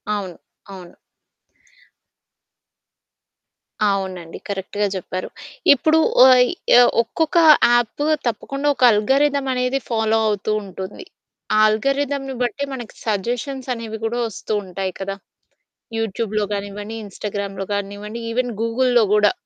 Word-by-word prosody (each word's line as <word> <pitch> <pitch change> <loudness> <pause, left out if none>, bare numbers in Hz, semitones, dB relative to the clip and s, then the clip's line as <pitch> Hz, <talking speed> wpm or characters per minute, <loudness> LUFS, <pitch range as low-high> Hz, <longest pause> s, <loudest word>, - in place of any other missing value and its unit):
అవును. 190 -4 -5 0.4
అవును. 180 -2 -12 2.9
అవునండి. 185 -4 -3
కరెక్ట్‌గా 200 +1 -2
జెప్పారు. 185 0 -5 0.4
ఇప్పుడు 315 +4 +2 0.3
ఓయ్ 250 -1 +6 0.3
ఆహ్, 245 - +6
ఒక్కొక్క 315 +8 -1 0.4
యాప్పు 240 +4 +1 0.2
తప్పకుండా 275 +5 -3
ఒక - - -2
అల్గారిథం 275 +6 +2
అనేది 250 +2 0
ఫాలో 225 -1 +1
అవుతూ 210 0 -1
ఉంటుంది. 190 - -8 0.5
ఆ - - +3
ఆల్గారిథమ్‌ని 275 +5 0
బట్టి 245 +3 -1
మనకి 240 -4 -7
సజెషన్స్ 245 +6 -3
అనేవి 225 -2 -6
గూడా 230 +2 -1
వస్తూ 220 0 -8
ఉంటాయి 190 0 -4
కదా! 195 0 -4 0.8
యూట్యూబ్‌లో 215 -1 -2
గానివ్వండి, 205 +2 -5
ఇన్‌స్టాగ్రామ్‌‌‌లో 200 -1 -5
గానివ్వండి. 205 +2 -5
ఈవెన్ 245 +1 -1
గూగుల్‌లో 240 +1 +2
గూడా. 210 -1 +4
220 Hz, 105 wpm, -20 LUFS, 200-250 Hz, 2.9 s, ఓయ్